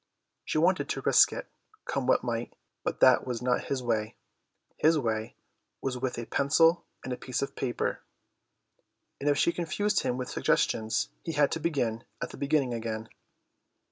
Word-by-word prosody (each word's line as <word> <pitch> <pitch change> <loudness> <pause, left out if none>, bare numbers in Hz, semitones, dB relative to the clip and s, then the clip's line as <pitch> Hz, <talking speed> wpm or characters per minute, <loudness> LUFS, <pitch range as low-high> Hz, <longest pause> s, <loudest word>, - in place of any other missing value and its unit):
She - - -2
wanted 180 +4 +2
to - - -2
risk - - +6
it, - - -6 0.4
come 135 -2 -2
what 130 - +3
might, 120 -1 -3 0.3
but - - -3
that 130 -1 +6
was 120 -2 -2
not 125 +1 0
his 135 -2 -2
way; 110 -3 -1 0.6
his 160 +1 +4
way 110 -5 -2 0.4
was 135 -1 -2
with 125 0 -3
a 120 - -4
pencil 165 +7 +3 0.2
and 130 - -3
a - - -4
piece 130 +1 -2
of 140 - -5
paper, 125 -2 -2 1.2
and 145 - +1
if 145 - +3
she 170 - +3
confused 185 +5 0
him 125 - -1
with 125 -1 -3
suggestions 110 0 +1
he 165 - -3
had 145 -1 +3
to 165 - -1
begin 125 -9 -1 0.2
at - - -4
the - - -10
beginning 140 -3 +1
again. 110 -1 -4
130 Hz, 175 wpm, -29 LUFS, 120-150 Hz, 1.2 s, risk